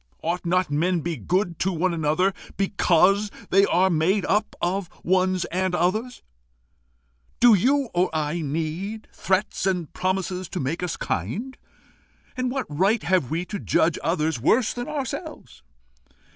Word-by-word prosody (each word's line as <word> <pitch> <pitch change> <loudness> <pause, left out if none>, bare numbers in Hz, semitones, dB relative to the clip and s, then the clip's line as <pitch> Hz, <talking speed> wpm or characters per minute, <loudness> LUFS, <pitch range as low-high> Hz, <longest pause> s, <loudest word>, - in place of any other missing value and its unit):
Ought 170 +2 -2
not 180 -2 +1
men 170 +4 +1
be 170 +1 -3
good 175 - -1
to 190 - +1
one 175 +1 0
another 165 +4 +1 0.2
because 195 +1 +3 0.2
they 195 +1 +5
are 185 +2 +3
made 175 +5 +2
up 210 +2 0
of 180 0 -1
ones 185 0 +2
and 185 0 0
others? 215 +9 -1 1.2
Do 240 -1 +7
you 265 +6 +2
or 180 +1 +2
I 155 +1 -1
need 165 +8 -4
threats 190 0 0
and 180 -5 -1
promises 185 -1 -2
to 185 - -4
make 150 +6 -2
us 180 -2 -3
kind? 200 - -3 0.8
And 255 0 -1
what 265 +1 -2
right 195 +9 +1
have 180 -8 +1
we 165 +4 -2
to 205 +2 -5
judge 160 0 +1
others 160 -6 0
worse 225 - +3
than 245 0 -5
ourselves? 295 +3 -6
185 Hz, 145 wpm, -24 LUFS, 165-200 Hz, 1.2 s, Do